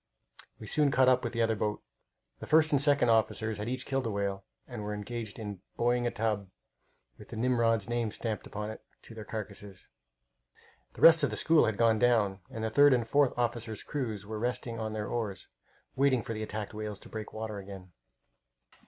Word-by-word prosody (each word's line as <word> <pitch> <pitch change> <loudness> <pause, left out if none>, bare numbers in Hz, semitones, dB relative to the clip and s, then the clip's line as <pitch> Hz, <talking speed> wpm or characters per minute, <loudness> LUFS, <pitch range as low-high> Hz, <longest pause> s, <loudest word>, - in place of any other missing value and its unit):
We - - -10
soon 145 +6 +2
caught 130 -1 +4
up 125 0 +3
with 120 - -2
the 115 -1 +1
other 115 0 +1
boat. 105 0 -2 0.6
The - - -8
first 155 0 +4
and 140 -2 +3
second 145 -4 +3
officers 110 -1 +1
had 105 +3 -3
each 130 +1 -3
killed 135 -3 -1
a - - -1
whale, 100 -2 -2 0.2
and 120 -4 -7
were 105 - -5
then - - -4
engaged 115 -1 -6
in 105 -5 -6 0.2
buoying 120 0 +2
a - - +2
tub, 105 -4 -2 0.7
with - - -12
the - - -8
Nimrod's 115 -3 +2
name 120 -2 -1
stamped 110 0 -4
upon 105 +1 -5
it, - - -10 0.2
to - - -12
their 110 -1 -8
carcasses. 105 -2 -7 1.0
The - - -12
rest 165 -1 +8
of 145 - +2
the - - -4
school 160 -1 +4
had 110 -2 -1
gone 115 -2 +3
down, 110 -5 +3
and 110 - -6
the 110 - -1
third 145 +3 +6
and 120 -2 -1
fourth 140 +1 +2
officers' 115 -2 -2
crews 110 -9 -4
were 110 +1 -5
resting 120 0 -2
on 110 -1 -3
their 105 -1 -3
oars, 105 -5 -4 0.5
waiting 130 -3 +3
for 115 - -4
the 110 - -5
attacked 110 0 -5
whales 105 -1 -5
to - - -12
break 110 -1 -7
water 110 -1 -5
again. 95 -2 -10
110 Hz, 205 wpm, -30 LUFS, 105-120 Hz, 1.0 s, rest